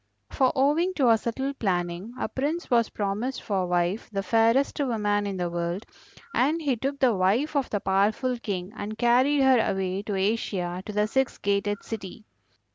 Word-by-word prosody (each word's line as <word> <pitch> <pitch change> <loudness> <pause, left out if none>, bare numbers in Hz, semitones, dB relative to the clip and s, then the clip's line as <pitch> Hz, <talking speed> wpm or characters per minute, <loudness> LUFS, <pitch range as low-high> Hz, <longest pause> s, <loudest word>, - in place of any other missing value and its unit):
For 260 -3 +2
owing 305 +7 +2
to 275 - +2
her 225 - +6
subtle 265 +5 -3
planning 180 -1 -2
a - - -2
Prince 295 +4 -3
was 235 -2 +3
promised 210 +6 -2
for 190 -4 -1
wife 175 +4 0
the 195 -1 -2
fairest 230 +9 +2
woman 210 -6 0
in 195 -1 -3
the 175 -1 -1
world, 170 +3 -3 0.5
and 300 +6 +2
he 285 -5 0
took 275 +4 -3
the 260 -4 +3
wife 210 +12 +1
of 275 -3 +1
the 205 - -1
powerful 215 +6 +1
King 195 -3 -4
and 215 +1 -6
carried 255 +4 +3
her 260 -2 +5
away 190 -2 -1
to 205 -1 -4
Asia 190 -3 -1
to - - -4
the 210 0 +1
six 265 +4 0
gated 200 0 -1
city. 215 -1 -7
220 Hz, 180 wpm, -26 LUFS, 195-260 Hz, 0.5 s, her